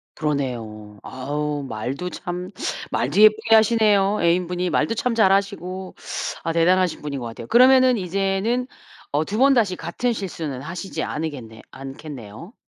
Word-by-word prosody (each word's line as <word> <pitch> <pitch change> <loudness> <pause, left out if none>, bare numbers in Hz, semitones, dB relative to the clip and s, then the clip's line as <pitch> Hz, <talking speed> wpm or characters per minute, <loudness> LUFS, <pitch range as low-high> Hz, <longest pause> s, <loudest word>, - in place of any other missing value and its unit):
그러네요. 115 -8 -4
아우 145 +3 -3
말도 130 +8 -4
참 180 +1 -6 0.4
말도 205 - +1
예쁘게 215 +1 +6
하시네요. 210 -2 +3
애인 175 +1 +2
분이 180 +1 -2
말도 230 - 0
참 235 +1 -1
잘하시고. 195 -3 0 0.5
아 165 - -1
대단하신 180 +1 +2
분인 145 -2 -4
것 120 - -4
같아요. 115 0 -9
그러면은 255 0 +6
이제는 195 +6 -1 0.4
어 145 +2 +1
2 205 - -4
번 275 +3 +5
다시 215 -7 +2
같은 180 +9 -2
실수는 165 - -5
하시지 185 +5 -5
않으겠네 130 -8 -5
않겠네요. 135 - -9
180 Hz, 315 characters per minute, -22 LUFS, 140-205 Hz, 0.5 s, 예쁘게